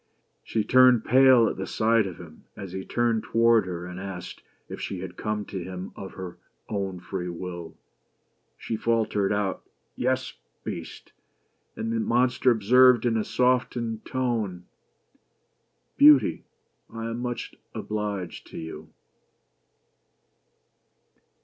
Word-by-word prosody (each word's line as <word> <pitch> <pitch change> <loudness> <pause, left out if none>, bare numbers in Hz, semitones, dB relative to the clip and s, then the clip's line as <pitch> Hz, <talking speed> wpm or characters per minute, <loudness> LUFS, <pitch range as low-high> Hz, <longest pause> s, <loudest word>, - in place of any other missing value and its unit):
She 110 - -1
turned 125 0 +5
pale 130 -2 +6
at - - -3
the - - -4
sight 110 -1 +2
of 90 -3 -8
him 80 -3 -13
as 95 -2 -7
he 95 +1 -5
turned 120 0 0
toward 115 -3 +3
her 90 -1 -5
and 90 +1 -7
asked, 95 -2 -7 0.2
" - - -43
If - - -8
she 95 -2 -4
had 90 -1 -7
come* 105 +1 -3
to 95 -3 -5
him 90 +1 -7
of 95 - -8
her 90 -2 -8 0.3
own 95 -3 -3
free 90 0 -5
will." 85 -1 -7 0.8
She 115 - -4
faltered 110 -4 +1
out 100 -2 -1 0.2
— - - -47
"Yes, 130 +1 -1 0.3
Beast," - - -7 0.6
and 115 +1 -3
the 115 - 0
monster 125 +3 +2
observed 125 +2 +5
in 120 -1 +2
a 110 - +1
softened 125 -3 0
tone 110 -9 -2 0.5
— - - -42
" - - -47
Beauty, 145 -2 +6 0.5
I 115 0 -6
am 115 +1 -4
much 120 -1 -4 0.2
obliged 105 -4 -4
to - - -10
you." 80 -1 -8
110 Hz, 140 wpm, -26 LUFS, 95-120 Hz, 0.8 s, pale